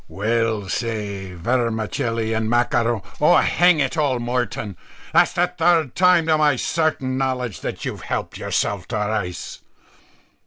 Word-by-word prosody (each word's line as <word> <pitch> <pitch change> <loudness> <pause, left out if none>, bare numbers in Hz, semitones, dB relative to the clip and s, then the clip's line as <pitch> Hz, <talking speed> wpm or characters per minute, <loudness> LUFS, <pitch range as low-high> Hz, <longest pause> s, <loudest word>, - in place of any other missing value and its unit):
_ - - -31
"Well, 110 0 -1
say 100 -4 -4
vermicelli 115 +1 -1
and 110 0 -1
macaro 120 -2 +1 0.2
Oh! - - +6
hang 175 -2 +4
it 135 +1 0
all, 140 -4 +1
Moreton, 120 -4 -3 0.4
that's - - +4
the 175 - +2
third 165 -5 +2
time 180 -2 +4
to 160 -1 +2
my 150 -2 +4
certain 135 -3 -1
knowledge, 125 -5 -2
that - - -5
you've - - -5
helped - - -4
yourself 100 -3 -1
to 120 - -4
rice." 105 -4 -3
120 Hz, 145 wpm, -21 LUFS, 110-140 Hz, 0.4 s, Oh